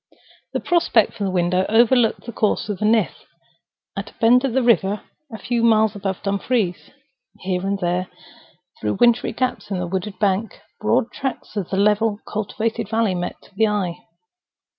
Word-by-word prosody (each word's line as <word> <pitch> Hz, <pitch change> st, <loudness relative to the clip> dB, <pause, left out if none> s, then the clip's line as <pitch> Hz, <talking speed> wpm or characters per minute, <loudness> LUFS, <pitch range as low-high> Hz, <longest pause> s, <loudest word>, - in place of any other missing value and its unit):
The -, -, 0 dB
prospect 340 Hz, -, +2 dB
from 205 Hz, -4 st, -3 dB
the -, -, -2 dB
window 180 Hz, 0 st, +1 dB
overlooked 235 Hz, +1 st, +3 dB
the 235 Hz, -, -5 dB
course 215 Hz, -1 st, 0 dB
of 205 Hz, -, -3 dB
the 210 Hz, -, 0 dB
Nith 220 Hz, 0 st, +1 dB, 0.7 s
at -, -, -5 dB
a -, -, -20 dB
bend 245 Hz, +2 st, +4 dB
of 270 Hz, -4 st, -1 dB
the 260 Hz, 0 st, +2 dB
river 210 Hz, -4 st, +2 dB, 0.3 s
a 220 Hz, -, -6 dB
few 235 Hz, +3 st, -1 dB
miles 220 Hz, -2 st, +3 dB
above 195 Hz, -2 st, -4 dB
Dumfries. 200 Hz, -1 st, -1 dB, 0.5 s
Here 185 Hz, -1 st, -1 dB
and 195 Hz, +1 st, -1 dB
there, 180 Hz, 0 st, -1 dB, 0.7 s
through 105 Hz, -1 st, -1 dB
wintry 240 Hz, 0 st, +4 dB
gaps 255 Hz, 0 st, -2 dB
in 195 Hz, -, -2 dB
the 180 Hz, -, -2 dB
wooded 190 Hz, +3 st, -4 dB
bank, 205 Hz, +1 st, 0 dB, 0.2 s
broad 225 Hz, +2 st, +1 dB
tracts 265 Hz, -4 st, -5 dB
of 200 Hz, -4 st, -3 dB
the 190 Hz, -, -2 dB
level 210 Hz, +1 st, +2 dB
cultivated 220 Hz, +1 st, -3 dB
valley 220 Hz, -3 st, +1 dB
met 175 Hz, 0 st, -5 dB
the 220 Hz, +2 st, +3 dB
eye. 195 Hz, -5 st, -1 dB
210 Hz, 170 wpm, -21 LUFS, 190-230 Hz, 0.7 s, bend